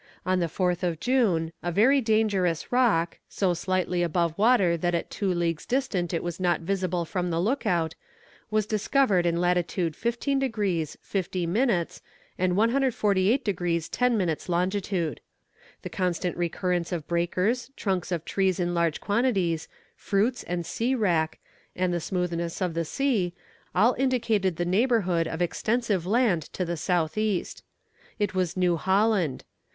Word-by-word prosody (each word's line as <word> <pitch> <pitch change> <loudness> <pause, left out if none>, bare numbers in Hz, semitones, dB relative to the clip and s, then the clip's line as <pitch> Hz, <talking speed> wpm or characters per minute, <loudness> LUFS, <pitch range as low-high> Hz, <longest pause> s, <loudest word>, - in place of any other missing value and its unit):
On 185 0 +2
the 170 - +1
4th 180 +2 -1
of 170 -3 -1
June, 190 -11 +1
a 175 - -2
very 255 +10 +4
dangerous 210 -7 +1
rock, 220 -10 +2
so 190 -3 +1
slightly 180 0 -1
above 170 -1 0
water 200 -5 +4
that 175 +1 0
at 170 - -3
two 195 -2 -1
leagues' 170 -3 -1
distant 210 -10 0
it 170 - -2
was 175 0 -4
not 175 -2 +1
visible 180 -1 -1
from 180 +1 -2
the 165 -1 0
look 230 +7 0
out, 165 -4 +1 0.6
was 215 -1 +1
discovered 215 -3 +2
in 170 0 +1
latitude 175 -2 0
15 240 - -1
degrees 200 - -1
50 185 -2 -2
minutes, 190 -1 0 0.3
and 180 0 0
148 230 -1 +2
degrees 175 -4 -1
10 250 -2 +1
minutes 175 -4 -1
longitude. 180 - -1 0.6
The - - -5
constant 180 -1 -1
recurrence 175 0 -1
of 165 -4 -3
breakers, 180 +9 0
trunks 190 -3 -2
of 170 -2 -2
trees 190 -2 0
in 175 0 0
large 170 -2 0
quantities, 200 -8 0 0.3
fruits 220 +6 0
and 175 -1 -3
sea 245 +9 -1
wrack, 170 -9 +1 0.4
and 180 -1 0
the 175 - 0
smoothness 170 -1 -2
of 180 -3 -1
the 165 0 -1
sea, 210 - 0 0.4
all 240 +4 +5
indicated 225 -8 +1
the 175 - -1
neighbourhood 185 -4 +2
of 165 +2 -2
extensive 210 -1 -1
land 215 -5 +2
to 185 - -2
the 170 0 -2
south 170 +2 0
east. 215 -4 -2 0.5
It 205 -2 -1
was 185 -1 -1
New 180 -2 +2
Holland. 190 - +1
180 Hz, 155 wpm, -26 LUFS, 170-215 Hz, 0.6 s, all